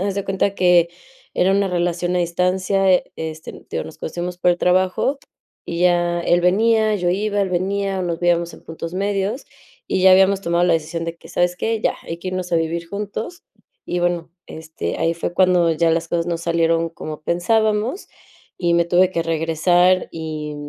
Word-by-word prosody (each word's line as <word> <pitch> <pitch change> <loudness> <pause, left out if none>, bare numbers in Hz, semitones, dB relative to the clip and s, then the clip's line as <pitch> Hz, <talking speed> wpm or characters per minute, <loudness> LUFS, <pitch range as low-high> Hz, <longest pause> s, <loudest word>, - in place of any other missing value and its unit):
haz 195 0 -1
de 200 - -3
cuenta 195 +1 0
que 175 -2 +4 0.4
era 185 - +2
una 200 +1 +2
relación 175 0 -1
a 180 - +2
distancia, 185 +2 +2
este, 160 0 -7
digo, - - -3
nos 160 - -11
conocimos 175 +2 -5
por 180 - +3
el 175 - -5
trabajo 185 +9 +1 0.5
y 170 0 -4
ya 175 -1 +2
él 175 +1 +2
venía, 220 +4 +3
yo 180 -3 -1
iba, 205 +2 0
él 195 - 0
venía, 195 +2 -1
nos 170 -1 -3
veíamos 170 -1 +1
en - - -16
puntos 165 +1 -7
medios 200 +5 -1 0.4
y 185 - -1
ya 190 - +7
habíamos 190 +1 +4
tomado 170 -1 +1
la 180 - +3
decisión 165 +1 -2
de 165 0 -5
que, - - -16
¿sabes 175 0 0
qué? 225 +2 -1
Ya, - - +1
hay 165 - -6
que 185 - -6
irnos 185 -1 -4
a - - +4
vivir 165 +1 -2
juntos 210 - -6 0.4
y, 175 - -2
bueno, 175 -1 -1 0.2
este, 155 - -6
ahí 165 - +1
fue 170 +1 -4
cuando 180 -2 +4
ya 165 +1 +2
las 165 0 0
cosas 170 0 -1
no 170 -1 -1
salieron 165 0 +1
como 155 -2 -8
pensábamos 215 - 0 0.5
y 175 -1 +1
me 170 0 +3
tuve 180 +1 +3
que 170 - -1
regresar 165 +3 +2
y, 155 -2 -5
175 Hz, 190 wpm, -20 LUFS, 170-190 Hz, 0.5 s, ya